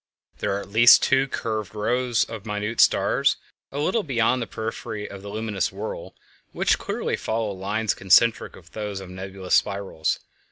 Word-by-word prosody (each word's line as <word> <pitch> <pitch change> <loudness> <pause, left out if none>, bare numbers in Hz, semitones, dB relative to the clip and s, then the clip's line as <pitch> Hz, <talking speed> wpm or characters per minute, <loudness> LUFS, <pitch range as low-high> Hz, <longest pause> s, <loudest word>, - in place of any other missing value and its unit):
There - - -1
are - - -3
at 100 - -9
least 120 +3 +8
two 135 0 +3
curved 110 -5 -4
rows 120 +2 +1
of 110 -3 -7
minute 105 +2 0
stars - - +3 0.3
a 140 - -6
little 185 +10 +1
beyond 125 - +1
the 115 - -3
periphery 110 -1 -5
of 100 - -9
the 100 - -8
luminous 105 -2 -2
whirl 100 +3 -6 0.4
which - - +2
clearly - - -2
follow 110 -1 -2
lines 100 +3 -1
concentric 110 +5 +3
with 85 -2 -16
those 105 -2 -4
of 95 -2 -9
the - - -10
nebulous 95 0 -5
spirals. 100 -6 +1
105 Hz, 170 wpm, -24 LUFS, 100-115 Hz, 0.4 s, least